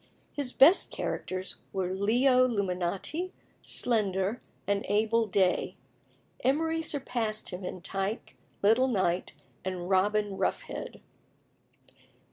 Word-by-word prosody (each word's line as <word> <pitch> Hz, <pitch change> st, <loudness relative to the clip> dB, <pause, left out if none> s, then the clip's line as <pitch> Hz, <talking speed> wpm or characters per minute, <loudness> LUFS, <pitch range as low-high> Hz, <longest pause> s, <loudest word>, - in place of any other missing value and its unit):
His 280 Hz, -4 st, -1 dB
best 315 Hz, +10 st, +6 dB
characters 185 Hz, 0 st, -4 dB
were 185 Hz, -1 st, -2 dB
Leo 250 Hz, +6 st, +3 dB
Luminati, 200 Hz, -, -2 dB, 0.3 s
Slender, 205 Hz, -2 st, +2 dB, 0.2 s
and 200 Hz, 0 st, 0 dB
Abel 220 Hz, +2 st, +2 dB
Day. 190 Hz, -2 st, +1 dB, 0.7 s
Emery 320 Hz, +4 st, +1 dB
surpassed 245 Hz, -8 st, 0 dB
him 180 Hz, 0 st, -7 dB
in 180 Hz, 0 st, -6 dB
Tyke, 195 Hz, +4 st, -4 dB, 0.3 s
Little 225 Hz, +6 st, +4 dB
Knight, 185 Hz, -9 st, 0 dB, 0.3 s
and 185 Hz, 0 st, -4 dB
Robin 205 Hz, +1 st, +1 dB
Roughhead. -, -, -3 dB
210 Hz, 95 wpm, -29 LUFS, 190-250 Hz, 0.7 s, best